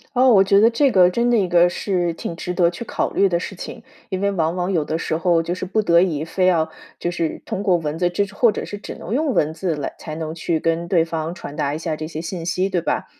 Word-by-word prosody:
哦。 255 +1 +5
我 195 - +7
觉 200 +1 +4
得 225 - +6
这 265 +4 +2
个 180 -4 +6
真 235 +5 +1
的 240 - +4
一 195 - +2
个 175 0 +4
是 175 -1 -1
挺 165 +1 -6
值 180 - -4
得 175 -2 +3
去 175 +7 -7
考 - - -2
虑 200 - +3
的 175 -2 +1
事 195 - -6
情。 - - -8 0.3
因 190 0 -3
为 200 0 +1
往 165 -2 0
往 180 +1 -1
有 165 -5 +1
的 160 - -2
时 160 -1 -2
候 170 -1 +2
就 175 - -2
是 185 - -4
不 215 +4 0
得 170 -3 +4
已 155 -5 0
非 185 +3 0
要 165 -3 +2 0.3
就 175 - -2
是 165 -2 -3
通 190 - -3
过 195 -3 +3
文 155 -1 -4
字 175 0 +2
这 200 +3 0
种 200 +1 -14
或 235 -3 +5
者 - - -4
是 205 - -6
只 205 - -8
能 - - -6
用 290 +1 +1
文 155 -5 +1
字 170 -1 -2
来 145 - -4
才 155 - -7
能 160 -1 -4
去 165 -1 -1
跟 165 +1 -1
对 170 -3 +3
方 165 0 -4
传 145 -4 -8
达 140 0 0
一 155 - -5
下 160 -2 -2
这 155 0 -5
些 160 -1 -6
信 165 0 -5
息， 180 +3 0
对 180 -3 0
吧？ - - -1
175 Hz, 310 characters per minute, -21 LUFS, 165-195 Hz, 0.3 s, 我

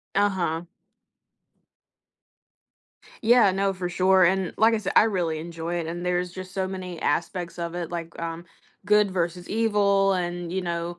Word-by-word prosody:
Uh-huh. 185 -5 +1 2.6
Yeah, 230 -4 +6
no, 195 +1 +1
for 185 -2 -4
sure, 185 +1 +4
and 190 0 +1
like 225 +1 +5
I - - +1
sai 215 - -3
I - - +8
really 175 -7 -1
enjoy 165 +1 -5
it, 165 - -3
and 175 +2 -5
there's 180 0 -1
just 185 0 -8
so 190 -1 -1
many 185 -2 -6
aspects 170 +3 -2
of 170 0 -4
it, 175 -2 -3
like, 170 -1 -6
um, 165 0 -5 0.4
good 210 -1 +3
versus 175 0 -2
evil 200 -3 +2
and, 175 -1 -3
you 190 - -1
know. 170 -1 -4
180 Hz, 160 wpm, -25 LUFS, 170-195 Hz, 2.6 s, I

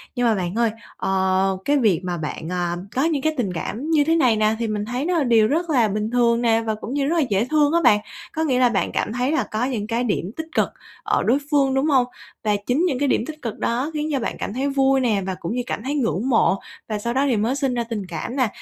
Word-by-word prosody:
Nhưng 245 -1 +2
mà 220 - +3
bạn 180 +1 -3
ơi, 230 -2 +2 0.3
ờ, 190 0 +1
cái 290 0 +3
việc 205 -9 +2
mà 175 -1 -2
bạn, 160 +1 -5
à, 175 -1 -1 0.2
có 265 - +2
những 310 -4 +1
cái 315 +2 +1
tình 200 -7 -1
cảm 235 - -4
như 310 -3 +4
thế 325 +3 +2
này 255 -8 +4
nè 215 0 +2
thì 230 - -1
mình 210 -1 -2
thấy 245 +6 -3
nó 355 0 +1
là 305 - +2
điều 225 -3 +4
rất 335 +5 -1
là 245 -7 +3
bình 210 +2 -2
thường 235 -1 +3
nè 230 -1 +3
và 220 -1 -2
cũng 225 +4 -7
như 280 -1 0
rất 335 - +1
là 310 - +4
dễ 205 +3 +2
thương 300 +2 +2
á 340 - +4
bạn. 210 - +6 0.3
Có 320 - -1
nghĩa 260 -5 +1
là 250 - +5
bạn 205 -4 0
cảm - - -1
thấy 250 +3 0
là 315 - +1
có 220 +3 0
những 225 -6 -3
cái 235 +2 0
điểm 200 -5 -1
tích 320 - -4
cực - - +2 0.3
ở - - +1
đối 250 +5 +3
phương, 275 -2 +3
đúng 270 +2 +1
hông? 265 -5 +4 0.4
Và 210 -1 +2
chính 280 +8 +2
những 275 -8 0
cái 285 - +1
điểm 235 - +1
tích 310 0 -8
cực 230 -3 -5
đó 255 +7 -1
khiến 305 +1 -2
cho 275 - 0
bạn 235 - -3
cảm - - -4
thấy 270 +4 -1
vui 270 -1 +3
nè 220 -6 +1
và 190 - -3
cũng 170 - -4
như 250 - 0
cảm 220 - -4
thấy 280 +3 -2
ngưỡng 235 - 0
mộ 225 -5 +3 0.3
và 215 -1 -2
sau 235 +3 -2
đó 270 +2 +2
thì 250 -6 +2
mới 230 +6 0
sinh 270 -3 0
ra 240 - -1
tình 225 -4 -4
cảm 170 +8 -5
nè. 255 -4 +2
240 Hz, 285 wpm, -22 LUFS, 215-275 Hz, 0.4 s, bạn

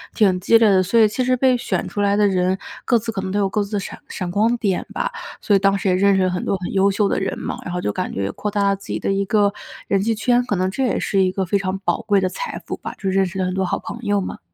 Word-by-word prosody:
挺 190 -4 +3
激 200 +5 +5
烈 225 -1 +4
的， 195 -2 +4
所 200 +6 +2
以 220 - +7
其 250 +5 -2
实 255 0 +2
被 260 0 +3
选 240 - -2
出 205 - -3
来 200 0 +2
的 205 0 +4
人 185 -1 +1 0.3
各 240 - +3
自 225 +1 -3
可 195 - -4
能 190 0 -4
都 205 - -1
有 200 -1 +2
各 210 +2 -1
自 200 +1 -9
的 205 - +1
闪 195 - -7
闪 180 -3 -5
光 225 +5 +2
点 200 -5 0
吧。 - - -2 0.3
所 205 - +2
以 - - +4
当 195 0 +3
时 195 - -3
也 - - +3
认 195 +1 +3
识 190 - +2
了 185 - +1
很 180 - -3
多 195 - 0
很 180 +1 -5
优 195 +1 +4
秀 200 +1 +1
的 - - 0
人 195 - -2
嘛， - - -5
然 - - -6
后 180 - -2
就 105 - -1
感 - - -3
觉 100 - -3
也 100 - -2
扩 210 - -4
大 205 0 0
了 200 - +2
自 195 - -14
己 - - -2
的 - - -1
一 195 0 0
个 205 0 +2 0.3
人 195 -1 +2
际 225 +2 0
圈， 245 +2 +2
可 205 - 0
能 185 0 0
这 265 - -2
也 250 - 0
是 195 - +1
一 185 -1 +2
个 190 0 -2
非 200 +3 +1
常 190 0 -2
宝 - - +1
贵 205 -2 +2
的 185 - +1
财 485 - -5
富 - - -4
吧， - - -7
就 195 - -5
认 195 0 +3
识 190 +2 -7
了 185 - 0
很 180 - -2
多 190 0 0
好 180 - -1
朋 235 - -7
友 205 -3 +1
嘛。 190 - -5
200 Hz, 355 characters per minute, -21 LUFS, 190-210 Hz, 0.3 s, 以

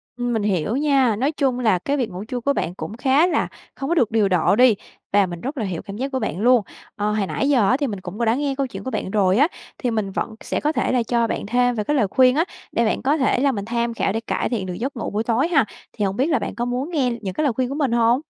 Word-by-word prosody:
Ừm, 245 0 -2
mình 220 -3 0
hiểu 200 +1 0
nha, 275 -5 +3
nói 270 +8 0
chung 270 -4 0
là 215 -7 +2
cái 280 +10 -1
việc 250 -5 -1
ngủ 180 +2 -6
trưa 245 +3 -4
của 280 +4 +1
bạn 175 - -2
cũng 215 - -6
khá 275 +6 +3
là 365 - +1 0.3
không 270 - -4
có 340 - +2
được 245 -10 +2
điều 215 -3 +2
độ 180 +1 +3
đi 245 -1 +6 0.4
và 200 -1 +5
mình 175 -2 -7
rất 275 +4 -5
là 230 - -1
hiểu 180 -4 -4
cảm 200 -1 -8
giác 270 +3 -3
của 260 - -1
bạn 185 - -3
luôn. 245 0 +5 0.3
Ờ, 210 0 -1
hồi 210 -2 0
nãy 275 - -1
giờ 240 -9 +4
á 255 - +3
thì 285 -1 -1
mình 205 -4 -4
cũng 185 +4 -8
có 235 - +1
đã 225 +1 +3
nghe 280 0 -1
câu 275 0 -1
chuyện - - -8
của 260 - -4
bạn 190 - -3
rồi 195 -1 +3
á, 290 - +5 0.3
thì 245 - -1
mình 215 -3 -1
vẫn 220 +3 -3
sẽ - - -2
có 300 - +1
thể - - 0
là 250 -2 +2
cho 235 0 +1
bạn - - -3
thêm 245 +3 +2
về 215 - -1
cái 295 - 0
lời 230 -8 +2
khuyên 255 +5 +4
á, 320 - +3 0.3
để 235 - +1
bạn 220 - 0
có 285 +4 +2
thể 260 -3 +2
là 275 +1 +3
mình 200 -5 -4
tham 235 +1 -1
khảo 215 - 0
để 225 - 0
cải 225 - -2
thiện 220 -6 -2
được 180 - -4
giấc 260 +10 -4
ngủ - - -3
buổi 210 +2 -1
tối 235 +6 +1
ha, 300 -8 +3 0.3
thì 210 - -1
hổng 195 0 -1
biết 265 - +2
là 295 -6 +2
bạn - - -5
có 240 - -2
muốn 250 +5 -2
nghe 270 -7 +1
những 190 -3 -4
cái 310 - -1
lời 275 - +2
khuyên 250 +2 -1
của 275 - -4
mình 285 -5 0
hông? 235 +2 +3
240 Hz, 315 wpm, -22 LUFS, 210-270 Hz, 0.4 s, đi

